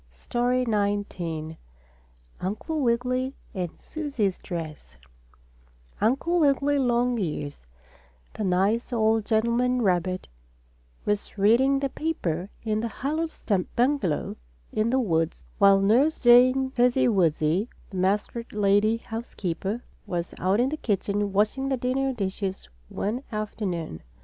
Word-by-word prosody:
STORY 245 Hz, -, 0 dB
XIX 200 Hz, -7 st, -2 dB, 0.8 s
UNCLE 220 Hz, -, -3 dB
WIGGILY 255 Hz, +2 st, 0 dB, 0.2 s
AND 180 Hz, -4 st, -4 dB
SUSIE'S 275 Hz, -, -2 dB
DRESS 155 Hz, -, -7 dB, 1.0 s
Uncle 275 Hz, +10 st, +2 dB
Wiggily 285 Hz, -1 st, +3 dB
Longears, 235 Hz, -, -1 dB, 0.7 s
the -, -, -4 dB
nice 195 Hz, +6 st, +1 dB
old 220 Hz, -2 st, +2 dB
gentleman 235 Hz, +2 st, +2 dB
rabbit, 185 Hz, -1 st, 0 dB, 0.8 s
was 205 Hz, +1 st, -2 dB
reading 240 Hz, +7 st, +4 dB
the 275 Hz, 0 st, -1 dB
paper 190 Hz, -, -2 dB
in 215 Hz, -1 st, 0 dB
his 230 Hz, -1 st, -3 dB
hollow 310 Hz, +9 st, -1 dB
stump 200 Hz, -, -2 dB
bungalow, 240 Hz, -, +1 dB, 0.4 s
in 215 Hz, +2 st, +1 dB
the 260 Hz, -, +2 dB
woods, 165 Hz, -9 st, 0 dB
while 200 Hz, -1 st, +7 dB
Nurse 245 Hz, +11 st, +3 dB
Jane 255 Hz, +2 st, +5 dB
Fuzzy 250 Hz, 0 st, +3 dB
Wuzzy, 175 Hz, 0 st, +2 dB, 0.2 s
the 190 Hz, -, -5 dB
muskrat 205 Hz, +5 st, -1 dB
lady 210 Hz, +2 st, +3 dB
house 230 Hz, 0 st, -7 dB
keeper, 195 Hz, +5 st, -3 dB, 0.2 s
was 175 Hz, -1 st, -3 dB
out 190 Hz, +4 st, +2 dB
in 250 Hz, +2 st, +3 dB
the 310 Hz, -, -3 dB
kitchen 205 Hz, -3 st, -1 dB
washing 215 Hz, +7 st, +1 dB
the 265 Hz, -, +1 dB
dinner 260 Hz, +2 st, 0 dB
dishes 195 Hz, -4 st, -3 dB, 0.2 s
one 220 Hz, +6 st, -2 dB
afternoon. 200 Hz, -, -3 dB
220 Hz, 120 wpm, -26 LUFS, 190-250 Hz, 1.0 s, while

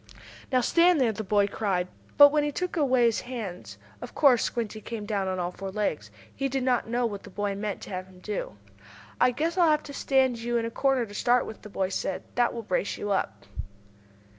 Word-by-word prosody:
"Now 255 Hz, -1 st, +3 dB
stand 340 Hz, +5 st, +4 dB
there!" 245 Hz, -4 st, +3 dB
the 220 Hz, +1 st, -5 dB
boy 205 Hz, 0 st, +3 dB
cried, 195 Hz, -3 st, -1 dB, 0.3 s
but 285 Hz, 0 st, +10 dB
when 300 Hz, 0 st, +2 dB
he 295 Hz, -, -1 dB
took 360 Hz, +4 st, -3 dB
away 260 Hz, -6 st, +3 dB
his 230 Hz, -2 st, +2 dB
hands 180 Hz, -, -7 dB, 0.2 s
of -, -, -9 dB
course 265 Hz, -6 st, +5 dB
Squinty 220 Hz, -2 st, -3 dB
came 220 Hz, -1 st, -6 dB
down 200 Hz, -2 st, -1 dB
on 185 Hz, 0 st, -2 dB
all 175 Hz, 0 st, -2 dB
four 195 Hz, +1 st, -6 dB
legs. 190 Hz, -, -2 dB, 0.3 s
He 275 Hz, +1 st, -1 dB
did 265 Hz, 0 st, -1 dB
not 250 Hz, -3 st, +1 dB
know 240 Hz, +1 st, +1 dB
what 205 Hz, -3 st, -4 dB
the -, -, -12 dB
boy 205 Hz, +1 st, -2 dB
meant 205 Hz, 0 st, -4 dB
to -, -, -9 dB
have 185 Hz, 0 st, -5 dB
him 190 Hz, -1 st, -17 dB
do. 195 Hz, -, -5 dB, 0.6 s
"I 250 Hz, -, +5 dB
guess 325 Hz, +8 st, -1 dB
I'll 340 Hz, -2 st, +5 dB
have 305 Hz, 0 st, +2 dB
to 285 Hz, -, -9 dB
stand 265 Hz, -3 st, +2 dB
you 240 Hz, +1 st, -1 dB
in 230 Hz, -, -1 dB
a 230 Hz, -, -4 dB
corner 270 Hz, -1 st, +1 dB
to 205 Hz, -, -12 dB
start 245 Hz, +3 st, +2 dB
with," 220 Hz, -, -9 dB
the 210 Hz, -, -10 dB
boy 190 Hz, -2 st, -1 dB
said. 190 Hz, -1 st, -3 dB
"That 245 Hz, -1 st, +2 dB
will 230 Hz, -, -6 dB
brace 195 Hz, 0 st, -1 dB
you 205 Hz, -, -3 dB
up." 100 Hz, -, -2 dB
230 Hz, 230 wpm, -27 LUFS, 195-260 Hz, 0.6 s, but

